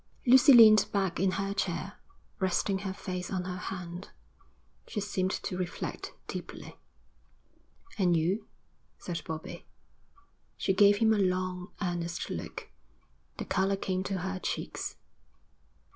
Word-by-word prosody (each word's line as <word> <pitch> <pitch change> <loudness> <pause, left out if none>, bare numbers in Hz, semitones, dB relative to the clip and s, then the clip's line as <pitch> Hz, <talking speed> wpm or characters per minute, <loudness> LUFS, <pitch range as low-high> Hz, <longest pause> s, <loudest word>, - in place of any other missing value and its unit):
Lucy 260 +2 +8
leaned 220 -4 +9
back 195 -5 0
in 190 +1 +3
her 195 0 -1
chair, 195 0 -3 0.4
resting 190 +1 +1
her 195 -1 -3
face 185 -2 -5
on 185 -2 -1
her 180 0 -4
hand. 180 -1 -7 0.8
She - - -3
seemed 190 -2 -1
to 185 -1 -3
reflect 180 -1 -4
deeply. - - -8 1.2
'And 175 -3 +4
you?' 190 +7 0 0.5
said 170 -2 -5
Bobbie. 160 0 -7 0.9
She 190 - +1
gave 205 +1 +6
him 220 +1 +4
a 210 - +1
long, 185 0 -1
earnest 175 -2 -3
look. - - -6 0.7
The - - -4
colour 190 +1 +1
came 185 -1 -2
to 195 -1 -2
her 190 +1 -3
cheeks. - - -4
190 Hz, 130 wpm, -30 LUFS, 180-200 Hz, 1.2 s, leaned